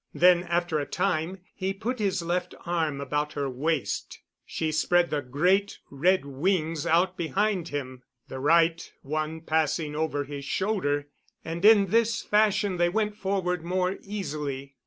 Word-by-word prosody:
Then, 180 0 +5
after 170 -2 0
a 145 - -3
time, 185 -1 -1
he 190 0 -3
put 240 +5 -3
his 195 -4 0
left 175 +1 -2
arm 160 -5 -1
about 145 +2 -2
her 140 -1 -2
waist. 140 +3 -2 0.3
She 160 -1 -2
spread 175 +3 +2
the 150 -1 0
great 180 +10 +1
red 175 +4 +2
wings 155 +2 -1
out 180 +3 +2
behind 190 +1 0
him, 130 -4 -5 0.3
the 130 - -7
right 165 +3 +3
one 155 +2 -3
passing 155 -1 0
over 150 -2 -1
his 140 0 -7
shoulder; 145 -4 -1 0.4
and 165 +2 -5
in 205 -3 +6
this 230 0 +2
fashion 210 -2 +2
they 175 0 +3
went 210 +2 -1
forward 190 -4 -1
more 185 +2 -1
easily. 145 -9 -5
170 Hz, 150 wpm, -27 LUFS, 150-190 Hz, 0.4 s, in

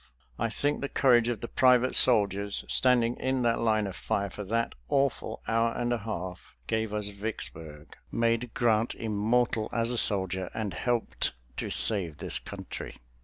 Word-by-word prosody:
I 115 - 0
think 145 +6 -1
the 140 - -3
courage 120 -3 +4
of 120 -4 -2
the 120 - -4
private 125 0 +3
soldiers, 100 -4 +5
standing 120 -2 +3
in 130 -1 -1
that 115 -1 +1
line 110 -2 +1
of 95 -2 -6
fire 100 -1 -2
for 105 - -7
that 115 +4 -1 0.2
awful 140 -2 -1
hour 115 0 +1
and 120 0 -1
a 120 - -1
half, 95 - -7
gave 110 - -1
us 105 -1 -2
Vicksburg, 85 -7 -7 0.2
made 115 +1 0
Grant 115 -1 +1
immortal 110 +1 0
as 115 0 -1
a 120 - 0
soldier, 95 -3 +1
and 105 -5 -3
helped 120 - -1 0.2
to - - -3
save 90 -9 0
this - - -3
country. - - -8
115 Hz, 165 wpm, -28 LUFS, 100-120 Hz, 0.2 s, soldiers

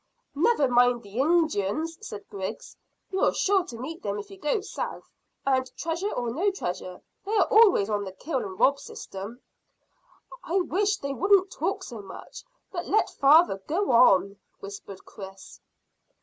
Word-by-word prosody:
"Never 305 - +3
mind 245 -1 +3
the 205 +4 -7
Injuns," 315 - +1
said 205 -1 -8
Griggs. 190 -1 -6 0.4
"You're 380 - +2
sure 390 -1 +2
to 235 - -9
meet 310 +8 -7
them 200 0 -3
if 205 - -8
you 390 - -10
go 300 +6 0
south, 400 - -6 0.3
and, 260 -1 +1
treasure 340 +5 -2
or 240 -1 -2
no 350 - +1
treasure, 180 - -5 0.2
they 420 +3 -1
are - - +4
always 420 - +6
on 205 -1 -1
the 190 - -6
kill 265 - -3
and 190 -5 -7
rob 280 +1 +4
system." 240 - -8 1.0
"I 345 - -3
wish 400 +4 0
they 280 0 -4
wouldn't 385 +4 +3
talk 380 +6 -2
so 230 - -8
much, 195 - -11 0.3
but 345 -2 -5
let 430 - +2
father 285 - +5
go 365 +1 0
on," 200 -5 +5 0.2
whispered 200 -1 -10
Chris. 195 -1 -11
275 Hz, 160 wpm, -26 LUFS, -, 1.0 s, always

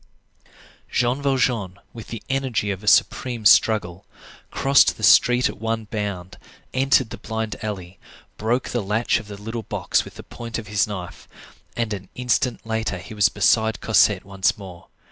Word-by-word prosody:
Jean 125 +3 0
Valjean, 120 -9 0 0.2
with 115 -2 -10
the 115 - -7
energy 130 -6 -1
of 100 +1 -6
a - - -10
supreme 120 +1 +2
struggle, 95 -3 +4 0.5
crossed 140 0 +3
the 110 - -10
street 125 +3 +5
at - - -7
one 115 0 -2
bound, 100 -4 -5 0.3
entered 130 -2 +2
the - - -7
blind 110 -1 -4
alley, 95 -3 -6 0.4
broke 120 +4 -1
the 120 - -1
latch 105 +4 0
of 110 - -12
the 100 -1 -8
little 115 +3 -5
box - - -1
with - - -13
the - - -10
point 115 -1 -7
of 115 - -6
his 105 -1 0
knife, 90 -4 -8 0.5
and 115 -2 -1
an 100 -2 -7
instant 125 -1 -1
later 110 -4 -2
he 95 +4 -10
was 105 -2 +3
beside 110 -1 +2
Cosette - - +3
once 95 -1 0
more. 95 -4 -11
110 Hz, 165 wpm, -22 LUFS, 100-120 Hz, 0.5 s, street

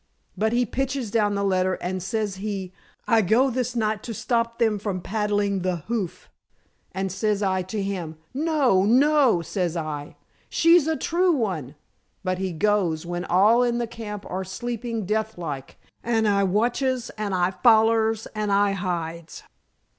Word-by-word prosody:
But 220 +1 +1
he 245 +1 +2
pitches 260 -1 -2
down 210 -2 +2
the 200 - -1
letter, 185 -1 +1
and 185 +1 -4
says 210 0 -2
he, 195 -2 -4 0.3
'I 225 -2 +4
go 225 +8 +3
this 250 0 -2
night 215 -2 0
to 230 -1 -6
stop 230 +2 -1
them 220 -3 +1
from 195 -2 -3
paddling 205 0 0
the 185 0 0
hoof,' 215 -7 -3 0.6
and 190 0 -3
says 210 +1 0
I 190 -1 +1
to 195 +3 -4
him, 175 -5 -4 0.2
'No! 275 - +2
No!' 255 - +4
says 175 -1 -2
I. 150 -2 -5 0.3
'She's 335 -2 +4
a 320 - +1
true 355 +1 +2
one.' 180 - -2 0.5
But 185 -1 -1
he 190 -1 -2
goes, 175 -3 +1
when 175 +1 -4
all 210 +7 +4
in 240 -1 +1
the 240 - 0
camp 220 -3 -7
are 190 +1 -3
sleeping 230 +2 -4
death 220 +1 -1
like, 145 -6 -6 0.3
and 225 -2 +1
I 200 -1 +3
watches, 240 +5 0
and 210 -3 -2
I 180 0 +2
follers, 225 0 +3
and 210 -1 -2
I 200 0 +3
hides." 170 -4 -4
210 Hz, 160 wpm, -24 LUFS, 185-230 Hz, 0.6 s, I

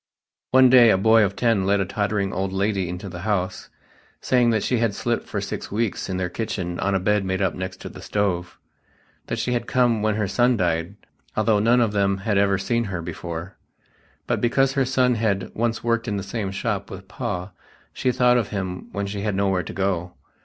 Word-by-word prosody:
One 130 -1 +6
day 120 -3 +8
a 100 - +4
boy 110 +3 +5
of 100 -1 -1
ten 115 -4 +2
led 100 +1 +2
a 95 - +1
tottering 100 0 -1
old 95 +1 -2
lady 95 -2 0
into 90 +3 -6
the 90 -1 -7
House, 95 -2 -2 0.5
saying 125 -2 +2
that 110 -3 +1
she 125 - +1
had 115 -3 0
slept 120 +2 -2
for - - -3
six - - -5
weeks 110 -1 -2
in 95 - -2
their 95 -1 -1
kitchen 90 -3 -4
on 100 0 0
a - - +2
bed 105 +2 +1
made 95 0 -1
up 95 -3 +1
next 95 0 -6
to - - -6
the - - -11
stove; 90 -4 -2 0.7
that - - -2
she 125 - -1
had 120 -1 -2
come 120 -4 +2
when 110 -1 +1
her 105 -2 0
son 120 +4 +2
died, 85 0 -1 0.4
although 110 -1 +3
none 115 +4 +4
of 115 -3 +2
them 100 -1 +1
had 105 -3 +2
ever 100 -1 +3
seen 115 +4 0
her 90 -4 -4
before; 85 +2 -6 0.7
but - - -1
because 135 +3 +2
her 135 -1 +2
son 125 -1 +2
had 105 -4 -1
"once 115 0 -1
worked 115 0 0
in 105 - -1
the 100 - -3
same 100 0 -3
shop 95 - -3
with - - -9
Pa 90 +2 -4 0.4
she 130 - 0
thought 125 0 +4
of 110 - -2
him 95 -3 -5
when 100 -1 -3
she 100 0 -4
had 105 -1 -1
nowhere 95 -2 +1
to 80 - -7
go." 90 -3 -2
100 Hz, 215 wpm, -23 LUFS, 95-115 Hz, 0.7 s, day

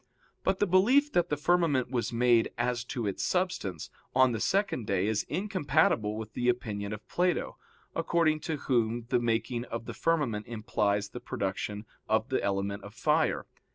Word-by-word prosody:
But 190 - +1
the 205 - +2
belief 245 +11 +4
that 175 -6 +2
the 150 - 0
firmament 150 -5 +2
was 120 -3 -1
made, 120 -1 +3
as 120 0 0
to 120 -3 -3
its 100 -2 -2
substance, 140 - -1 0.2
on 130 -1 +5
the 115 - -2
second 190 - 0
day 95 -1 +1
is 110 0 0
incompatible 145 - +1
with 110 -1 -7
the 125 0 +1
opinion 105 -4 -2
of 105 0 -7
Plato, 180 0 0 0.4
according 160 -2 +2
to 155 - 0
whom 120 -4 0
the - - +3
making 120 +1 -1
of 115 -1 -5
the - - -6
firmament 145 -11 0
implies 105 -3 -1
the 125 - -7
production 100 +1 -3 0.2
of - - +1
the - - 0
element 100 +1 -1
of 100 +2 -11
fire. 155 +5 +1
120 Hz, 170 wpm, -29 LUFS, 105-160 Hz, 0.4 s, on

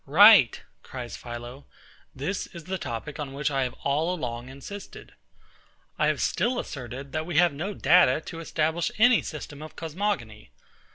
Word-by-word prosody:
Right, 180 - +8 0.2
cries 125 -2 -7
PHILO: 120 +3 -8 0.5
This 145 +9 -3
is 170 -2 -11
the 185 +3 -4
topic 120 +7 -5
on 140 -2 -5
which 145 +1 -1
I 135 -1 +1
have 125 - -5
all 150 +5 +1
along 120 -5 -5
insisted. 140 +10 -10 0.9
I - - +3
have - - +1
still 245 +1 +1
asserted, 135 - -6
that 155 +1 -3
we 175 -4 -2
have 175 -3 +5
no 185 +8 -4
data 170 -6 +5
to 165 - -8
establish 160 +1 -1
any 230 +1 +6
system 150 -1 -7
of 155 - -9
cosmogony. 160 - -3
150 Hz, 160 wpm, -26 LUFS, 130-175 Hz, 0.9 s, Right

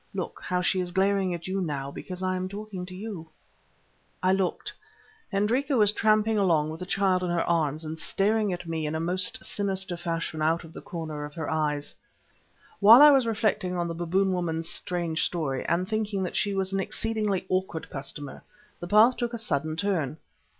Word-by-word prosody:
Look, - - -4
how 180 0 0
she 185 +1 +2
is 180 -1 -1
glaring 190 0 +1
at 170 +1 -8
you 190 +1 -1
now 140 -5 -3
because 185 +5 -7
I 185 0 0
am 185 0 -3
talking 200 -2 -6
to 185 - -9
you!" 190 -5 -7 0.9
I 185 +1 +4
looked. 190 -2 -1 0.6
Hendrika 245 +8 +1
was 210 -2 +6
tramping 215 0 +2
along 160 -6 +2
with 160 - -7
the 180 - -6
child 190 -1 +2
in 180 - -1
her 175 -1 +1
arms 155 -2 +1
and 160 +1 -5
staring 210 +3 +1
at 175 -1 -5
me 160 -2 -2
in 150 - -3
a - - -1
most 180 +3 -1
sinister 190 -3 -2
fashion 165 -2 -3
out 165 +2 +1
of 165 -1 -13
the - - -8
corners 155 -3 -5
of 150 - -16
her 160 -3 -3
eyes. 150 -2 -1 0.9
While 225 +7 +9
I 295 - +10
was 265 -4 +4
reflecting 210 -5 0
on 175 0 0
the 165 - -3
Baboon 185 +3 +1
woman's 165 -2 -2
strange 170 -2 -1
story, 145 -7 -1
and 175 +2 +1
thinking 210 -2 -1
that 180 - -4
she 200 -1 +1
was 190 0 -1
an 195 - +1
exceedingly 210 -2 -1
awkward 185 -3 -2
customer, 140 0 -6 0.4
the 175 - -6
path 220 +6 +6
took 240 -1 -2
a - - -3
sudden 155 -7 -1
turn. 165 -6 -1
180 Hz, 195 wpm, -27 LUFS, 165-200 Hz, 0.9 s, I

